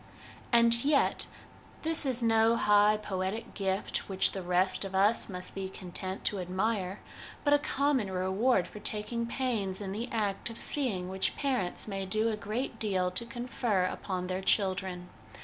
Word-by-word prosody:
And 235 Hz, 0 st, +5 dB
yet 285 Hz, 0 st, +4 dB, 0.6 s
this 320 Hz, -2 st, +3 dB
is 250 Hz, -2 st, 0 dB
no 225 Hz, 0 st, +4 dB
high 210 Hz, -1 st, +4 dB
poetic 205 Hz, +3 st, -4 dB
gift 195 Hz, 0 st, -2 dB
which 190 Hz, -1 st, +2 dB
the 195 Hz, -, -5 dB
rest 185 Hz, +1 st, +1 dB
of 195 Hz, -1 st, -5 dB
us 205 Hz, +5 st, +3 dB
must 180 Hz, -1 st, -5 dB
be 190 Hz, -1 st, -4 dB
content 185 Hz, +1 st, -4 dB
to 205 Hz, -, +1 dB
admire, 190 Hz, +1 st, -2 dB, 0.4 s
but 290 Hz, -, +3 dB
a 290 Hz, -, +5 dB
common 280 Hz, -7 st, 0 dB
reward 190 Hz, +3 st, +1 dB
for 210 Hz, -, -10 dB
taking 220 Hz, +3 st, -2 dB
pains 230 Hz, -7 st, -2 dB
in 195 Hz, -2 st, -5 dB
the 230 Hz, +5 st, -4 dB
act 210 Hz, -2 st, -1 dB
of 230 Hz, -, -8 dB
seeing 215 Hz, -11 st, -1 dB
which 190 Hz, +1 st, 0 dB
parents 255 Hz, -12 st, 0 dB
may 195 Hz, -2 st, -4 dB
do 215 Hz, +4 st, +1 dB
a 220 Hz, -, -1 dB
great 220 Hz, +3 st, -4 dB
deal 185 Hz, -4 st, 0 dB
to 210 Hz, +6 st, -4 dB
confer 240 Hz, -5 st, -1 dB
upon 185 Hz, 0 st, -3 dB
their 185 Hz, +1 st, -3 dB
children. 190 Hz, -2 st, 0 dB
205 Hz, 165 wpm, -30 LUFS, 190-235 Hz, 0.6 s, And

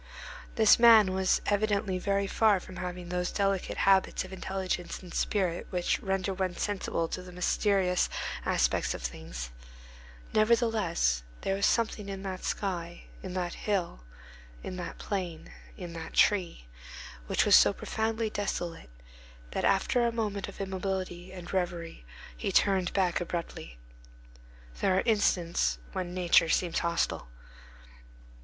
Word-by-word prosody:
This 220 Hz, 0 st, +6 dB
man 220 Hz, -5 st, +7 dB
was 190 Hz, 0 st, +2 dB
evidently 205 Hz, -2 st, +1 dB
very 200 Hz, +1 st, 0 dB
far 210 Hz, 0 st, +3 dB
from 185 Hz, 0 st, -11 dB
having 180 Hz, -1 st, -5 dB
those 180 Hz, 0 st, -1 dB
delicate 195 Hz, -2 st, -1 dB
habits 190 Hz, -1 st, +3 dB
of 185 Hz, -, -10 dB
intelligence 190 Hz, -1 st, -3 dB
and 180 Hz, -, -10 dB
spirit 185 Hz, -5 st, 0 dB
which 180 Hz, -1 st, 0 dB
render 195 Hz, -1 st, -1 dB
one 185 Hz, -1 st, -2 dB
sensible 190 Hz, -5 st, -1 dB
to 185 Hz, -, -4 dB
the 180 Hz, 0 st, -11 dB
mysterious 180 Hz, 0 st, +1 dB, 0.3 s
aspects -, -, +1 dB
of -, -, -8 dB
things; -, -, -6 dB, 0.8 s
nevertheless, 215 Hz, -, +2 dB, 0.2 s
there 195 Hz, -, 0 dB
was 200 Hz, +1 st, +2 dB
something 220 Hz, -3 st, 0 dB
in 195 Hz, 0 st, -6 dB
that 185 Hz, -2 st, -5 dB
sky, 175 Hz, -4 st, -3 dB, 0.2 s
in 185 Hz, -1 st, -6 dB
that 175 Hz, -2 st, -2 dB
hill, 190 Hz, -, -2 dB, 0.6 s
in 185 Hz, -, -5 dB
that 180 Hz, -, -6 dB
plain, 180 Hz, -5 st, -4 dB, 0.3 s
in 175 Hz, -2 st, -7 dB
that 165 Hz, -1 st, -7 dB
tree, 180 Hz, -, +2 dB, 0.6 s
which -, -, +2 dB
was -, -, +7 dB
so -, -, +7 dB
profoundly 220 Hz, 0 st, -2 dB
desolate, 175 Hz, -, -3 dB, 0.6 s
that -, -, -2 dB
after 220 Hz, +5 st, +2 dB
a -, -, 0 dB
moment 210 Hz, -4 st, -2 dB
of 200 Hz, -, -11 dB
immobility 190 Hz, -2 st, -3 dB
and 180 Hz, -1 st, -9 dB
reverie 175 Hz, -, -3 dB, 0.3 s
he -, -, -3 dB
turned 190 Hz, -3 st, +3 dB
back 185 Hz, -3 st, +1 dB
abruptly. 170 Hz, -, -5 dB, 1.0 s
There 185 Hz, -, +2 dB
are -, -, +2 dB
instants 175 Hz, -, +2 dB
when 180 Hz, -1 st, -4 dB
nature 175 Hz, -2 st, +4 dB
seems 170 Hz, 0 st, +1 dB
hostile. 170 Hz, -, -1 dB
185 Hz, 135 wpm, -29 LUFS, 175-200 Hz, 1.0 s, man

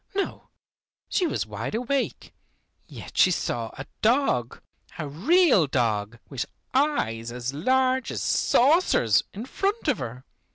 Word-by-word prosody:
No, 395 Hz, -, -3 dB, 0.6 s
she 360 Hz, -, +1 dB
was -, -, -2 dB
wide 110 Hz, -, -5 dB
awake, 255 Hz, +4 st, -2 dB, 0.5 s
yet -, -, -11 dB
she -, -, +7 dB
saw 120 Hz, -9 st, -2 dB
a 135 Hz, -, -6 dB, 0.2 s
dog, 220 Hz, -, +1 dB, 0.4 s
a 155 Hz, -, -4 dB
real 235 Hz, -, +4 dB
dog 115 Hz, -4 st, -1 dB
with 135 Hz, -1 st, -4 dB, 0.3 s
eyes 120 Hz, -, 0 dB
as 125 Hz, +2 st, -4 dB
large 260 Hz, -, +1 dB
as -, -, -3 dB
saucers, 250 Hz, -, +3 dB
in 215 Hz, +5 st, -7 dB
front 400 Hz, -, -2 dB
of -, -, +2 dB
her. 125 Hz, 0 st, -7 dB
165 Hz, 130 wpm, -25 LUFS, -, 0.6 s, she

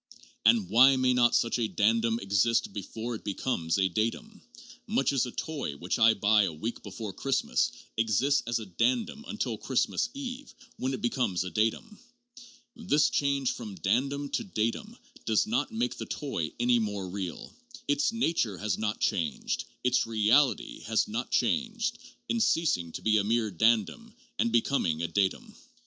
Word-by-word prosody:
And 225 Hz, -5 st, +4 dB
why 130 Hz, +3 st, +6 dB
may 130 Hz, -1 st, +2 dB
not 120 Hz, -1 st, +4 dB
such 115 Hz, +1 st, +1 dB
a 115 Hz, -, +1 dB
dandum 115 Hz, +2 st, +2 dB
exist 100 Hz, +2 st, +1 dB
before 110 Hz, +4 st, -5 dB
it 110 Hz, -, -7 dB
becomes 95 Hz, -5 st, -1 dB
a 95 Hz, -1 st, +3 dB
datum, 115 Hz, -, -3 dB, 0.5 s
much 220 Hz, -, +1 dB
as 130 Hz, -2 st, +1 dB
a -, -, -6 dB
toy 140 Hz, -, -4 dB
which 90 Hz, +4 st, -2 dB
I 110 Hz, 0 st, +6 dB
buy 105 Hz, +1 st, +4 dB
a -, -, -2 dB
week 110 Hz, +10 st, -5 dB
before 110 Hz, -4 st, -7 dB
Christmas 135 Hz, +6 st, 0 dB, 0.3 s
exists 115 Hz, +6 st, +2 dB
as 120 Hz, -, 0 dB
a 110 Hz, -, -6 dB
dandum 120 Hz, -, -1 dB
till 120 Hz, -, -2 dB
Christmas 135 Hz, -, 0 dB
Eve, 270 Hz, 0 st, -7 dB, 0.2 s
when 130 Hz, +1 st, -1 dB
it -, -, -9 dB
becomes 120 Hz, -7 st, 0 dB
a 95 Hz, -, -6 dB
datum? 115 Hz, -, -1 dB, 0.8 s
This 185 Hz, -10 st, +2 dB
change 140 Hz, -2 st, +1 dB
from 105 Hz, -4 st, -7 dB
dandum 135 Hz, -, -1 dB
to -, -, -1 dB
datum 195 Hz, -, -3 dB, 0.3 s
does 110 Hz, -, +2 dB
not 235 Hz, +4 st, -1 dB
make 235 Hz, +2 st, -1 dB
the -, -, -5 dB
toy 85 Hz, -, -3 dB
any 120 Hz, 0 st, +3 dB
more 105 Hz, -3 st, -3 dB
real. 90 Hz, -2 st, -6 dB, 0.3 s
Its 145 Hz, +7 st, +2 dB
nature 165 Hz, -, 0 dB
has 105 Hz, -1 st, -2 dB
not 110 Hz, 0 st, -2 dB
changed, 80 Hz, -6 st, -1 dB, 0.2 s
its 125 Hz, -1 st, +2 dB
reality 115 Hz, +5 st, +2 dB
has 110 Hz, 0 st, +1 dB
not 115 Hz, +4 st, -4 dB
changed, 235 Hz, 0 st, 0 dB, 0.3 s
in 235 Hz, -, 0 dB
ceasing 155 Hz, -, +1 dB
to -, -, -7 dB
be 110 Hz, 0 st, +3 dB
a 105 Hz, -, +2 dB
mere 110 Hz, 0 st, 0 dB
dandum 115 Hz, -, +1 dB, 0.2 s
and 115 Hz, -, +2 dB
becoming 110 Hz, -, +1 dB
a -, -, 0 dB
datum. 95 Hz, +3 st, -1 dB
115 Hz, 165 wpm, -28 LUFS, 105-145 Hz, 0.8 s, why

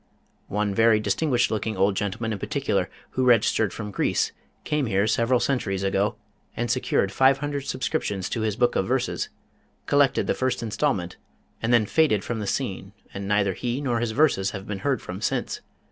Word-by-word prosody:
One 105 Hz, 0 st, -1 dB
very 115 Hz, +1 st, +4 dB
distinguished 120 Hz, +4 st, +1 dB
looking 110 Hz, -1 st, -2 dB
old 95 Hz, +1 st, +3 dB
gentleman 110 Hz, +3 st, -2 dB
in 100 Hz, -, -5 dB
particular, -, -, -1 dB, 0.2 s
who 130 Hz, -, 0 dB
registered 115 Hz, -3 st, +3 dB
from 105 Hz, -2 st, -6 dB
Greece, -, -, +1 dB, 0.3 s
came 150 Hz, -4 st, 0 dB
here 100 Hz, -1 st, +2 dB
several 115 Hz, +3 st, +2 dB
centuries 100 Hz, -9 st, -1 dB
ago 100 Hz, +1 st, +1 dB, 0.4 s
and 120 Hz, 0 st, 0 dB
secured 120 Hz, -5 st, +1 dB
five 135 Hz, +5 st, +4 dB
hundred 145 Hz, -1 st, -3 dB
subscriptions 100 Hz, -6 st, -2 dB
to 115 Hz, -, -2 dB
his 110 Hz, -2 st, 0 dB
book 120 Hz, +1 st, +2 dB
of 95 Hz, -, +1 dB
verses, 130 Hz, 0 st, -1 dB, 0.6 s
collected 145 Hz, -1 st, +3 dB
the -, -, +1 dB
first 130 Hz, -2 st, -1 dB
instalment, 110 Hz, -5 st, -1 dB, 0.4 s
and 115 Hz, -, 0 dB
then 115 Hz, -3 st, +5 dB
faded 125 Hz, -6 st, +2 dB
from 120 Hz, -2 st, -3 dB
the 105 Hz, -, -4 dB
scene 95 Hz, -5 st, -3 dB, 0.2 s
and 100 Hz, 0 st, -5 dB
neither 100 Hz, -1 st, +2 dB
he 120 Hz, +5 st, -2 dB
nor 125 Hz, -5 st, 0 dB
his 120 Hz, -1 st, -1 dB
verses 110 Hz, -6 st, +2 dB
have 95 Hz, -1 st, -7 dB
been 105 Hz, -2 st, -4 dB
heard 140 Hz, +2 st, -1 dB
from 90 Hz, +3 st, -6 dB
since. -, -, -2 dB
110 Hz, 180 wpm, -25 LUFS, 100-130 Hz, 0.6 s, then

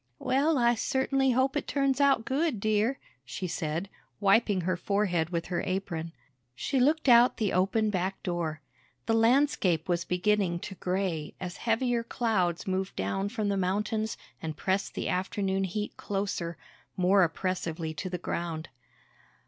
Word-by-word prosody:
"Well, 285 Hz, -, +2 dB
I 240 Hz, -1 st, +4 dB
certainly 265 Hz, +2 st, +1 dB
hope 260 Hz, +3 st, +2 dB
it 295 Hz, -, -2 dB
turns 275 Hz, -1 st, +1 dB
out 275 Hz, -5 st, +4 dB
good, 275 Hz, -3 st, 0 dB
dear," 215 Hz, +5 st, +1 dB, 0.3 s
she 130 Hz, +9 st, -5 dB
said, 165 Hz, +1 st, -2 dB, 0.3 s
wiping 205 Hz, -1 st, +3 dB
her 185 Hz, +1 st, 0 dB
forehead 180 Hz, -3 st, 0 dB
with 170 Hz, -2 st, -2 dB
her 175 Hz, -, 0 dB
apron. 180 Hz, -4 st, -3 dB, 0.4 s
She 265 Hz, -, -1 dB
looked 300 Hz, +4 st, +2 dB
out 240 Hz, 0 st, +6 dB
the 215 Hz, -5 st, 0 dB
open 210 Hz, +4 st, +2 dB
back 190 Hz, 0 st, -2 dB
door. 170 Hz, -4 st, -2 dB, 0.4 s
The 225 Hz, -, +1 dB
landscape 225 Hz, -, +3 dB
was 175 Hz, -1 st, +1 dB
beginning 180 Hz, 0 st, +1 dB
to 195 Hz, -, -6 dB
gray 180 Hz, -4 st, -2 dB
as 180 Hz, 0 st, -5 dB
heavier 235 Hz, +1 st, +1 dB
clouds 205 Hz, -8 st, 0 dB
moved 190 Hz, 0 st, -2 dB
down 100 Hz, -, -1 dB
from 215 Hz, -2 st, -2 dB
the 200 Hz, -, 0 dB
mountains 210 Hz, +4 st, -1 dB, 0.2 s
and 155 Hz, -2 st, -5 dB
pressed 190 Hz, +4 st, -1 dB
the -, -, -2 dB
afternoon 190 Hz, +1 st, 0 dB
heat 210 Hz, +3 st, -4 dB
closer, 195 Hz, -4 st, -3 dB, 0.4 s
more 190 Hz, +2 st, +4 dB
oppressively 170 Hz, -2 st, -1 dB
to 155 Hz, +4 st, -5 dB
the 180 Hz, -, -3 dB
ground. 170 Hz, -2 st, -4 dB
195 Hz, 150 wpm, -29 LUFS, 175-230 Hz, 0.4 s, out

